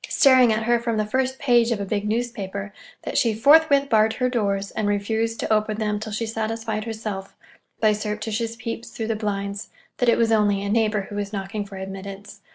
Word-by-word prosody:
staring 260 Hz, -4 st, +6 dB
at 220 Hz, +1 st, 0 dB
her 240 Hz, +1 st, +2 dB
from 230 Hz, -1 st, -2 dB
the 215 Hz, -, +1 dB
first 260 Hz, +4 st, -1 dB
page 240 Hz, -4 st, +3 dB
of 230 Hz, -4 st, 0 dB
a 200 Hz, -, -2 dB
big 205 Hz, +1 st, -2 dB
newspaper, 210 Hz, -3 st, -3 dB, 0.3 s
that -, -, 0 dB
she 230 Hz, -3 st, +1 dB
forthwith 280 Hz, +3 st, +5 dB
barred 220 Hz, -2 st, +3 dB
her 255 Hz, -1 st, 0 dB
doors, 200 Hz, -4 st, -1 dB
and 215 Hz, -1 st, -2 dB
refused 220 Hz, +3 st, -1 dB
to -, -, 0 dB
open 215 Hz, 0 st, 0 dB
them 210 Hz, -1 st, -1 dB
till 215 Hz, 0 st, -6 dB
she 220 Hz, +2 st, -2 dB
satisfied 225 Hz, -1 st, -3 dB
herself, 215 Hz, -4 st, -5 dB, 0.4 s
by 215 Hz, -1 st, +4 dB
surreptitious 215 Hz, +2 st, -3 dB
peeps 230 Hz, +1 st, -6 dB
through 225 Hz, -, -5 dB
the 225 Hz, 0 st, -1 dB
blinds, 200 Hz, -1 st, -3 dB, 0.3 s
that 245 Hz, -, +2 dB
it -, -, +4 dB
was 230 Hz, -1 st, +2 dB
only 205 Hz, -2 st, +2 dB
a 200 Hz, -, -3 dB
neighbor 215 Hz, -1 st, +2 dB
who 200 Hz, +1 st, -9 dB
was 205 Hz, -1 st, -3 dB
knocking 200 Hz, +1 st, -4 dB
for 200 Hz, -1 st, -10 dB
admittance. 195 Hz, +1 st, -8 dB
215 Hz, 205 wpm, -23 LUFS, 205-230 Hz, 0.4 s, staring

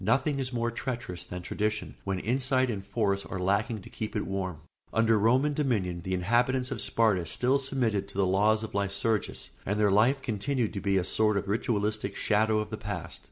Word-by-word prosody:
Nothing 140 Hz, +7 st, +2 dB
is 130 Hz, -1 st, -2 dB
more 120 Hz, -1 st, -1 dB
treacherous 120 Hz, -8 st, -4 dB
than 90 Hz, 0 st, -7 dB
tradition, 105 Hz, +3 st, -2 dB
when 95 Hz, -1 st, -1 dB
insight 130 Hz, +4 st, +1 dB
and 100 Hz, -3 st, -4 dB
force 100 Hz, -1 st, 0 dB
are -, -, -6 dB
lacking 100 Hz, +3 st, 0 dB
to -, -, -11 dB
keep 110 Hz, -, -5 dB
it 105 Hz, -, -1 dB
warm. 95 Hz, -5 st, -3 dB, 0.3 s
Under 110 Hz, -1 st, +3 dB
Roman 130 Hz, +7 st, +3 dB
dominion, 105 Hz, -, 0 dB
the 95 Hz, +2 st, -2 dB
inhabitants 120 Hz, +7 st, +1 dB
of -, -, -2 dB
Sparta 110 Hz, -6 st, +2 dB
still 130 Hz, +9 st, +2 dB
submitted 120 Hz, -7 st, -1 dB
to 100 Hz, -, -9 dB
the 100 Hz, -, +3 dB
laws 105 Hz, +4 st, +3 dB
of 110 Hz, -, -6 dB
Lycurgus 100 Hz, +2 st, -1 dB
and 105 Hz, +2 st, -1 dB
their 105 Hz, -2 st, +4 dB
life 115 Hz, +8 st, +4 dB
continued 120 Hz, +1 st, -1 dB
to 100 Hz, -, -4 dB
be 100 Hz, -1 st, +2 dB
a 95 Hz, -, +2 dB
sort 105 Hz, +2 st, +2 dB
of 100 Hz, -, -2 dB
ritualistic 105 Hz, 0 st, -1 dB
shadow 110 Hz, +1 st, +2 dB
of 105 Hz, 0 st, -2 dB
the 110 Hz, -, -3 dB
past. 90 Hz, -6 st, -5 dB
105 Hz, 200 wpm, -29 LUFS, 100-120 Hz, 0.3 s, their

